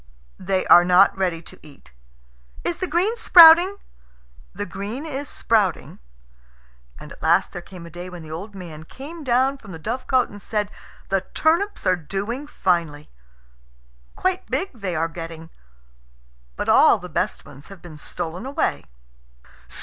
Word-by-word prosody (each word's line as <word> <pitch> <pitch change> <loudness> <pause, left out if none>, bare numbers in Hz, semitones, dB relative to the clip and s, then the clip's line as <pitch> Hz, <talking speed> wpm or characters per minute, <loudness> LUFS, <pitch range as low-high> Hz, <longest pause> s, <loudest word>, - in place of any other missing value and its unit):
"They 190 0 -1
are 175 - +8
not 180 +2 +5
ready 180 -3 -2
to - - -14
eat." 140 - -18 0.7
"Is 345 - -2
the 370 - -1
green 355 +8 +1
sprouting?" 350 -2 +8 0.7
"The 205 - -5
green 205 - -6
is 285 -2 -5
sprouting." 210 -6 0 1.0
And - - -12
at - - -13
last - - +2
there 175 - -7
came 175 -1 -12
a 170 - -12
day 175 +2 -8
when 175 -2 -10
the 155 - -11
old 195 +6 -7
man 165 -5 -9
came 295 - -10
down 260 +2 +1
from 200 -6 -12
the - - -7
dovecot 255 - 0
and 205 0 -12
said: 210 -1 -2 0.4
"The 195 -1 +1
turnips 340 +6 +1
are 185 - +3
doing 200 - -5
finely 170 - -1 1.0
quite 370 0 -2
big 350 +9 -1
they 200 -7 -4
are 160 +1 0
getting; 165 -1 -9 1.0
but - - -4
all - - +6
the - - -9
best - - -3
ones 140 +4 -14
have 195 -3 -14
been 155 -4 -11
stolen 175 +11 -6
away." 270 - -2
195 Hz, 155 wpm, -22 LUFS, 170-270 Hz, 1.0 s, are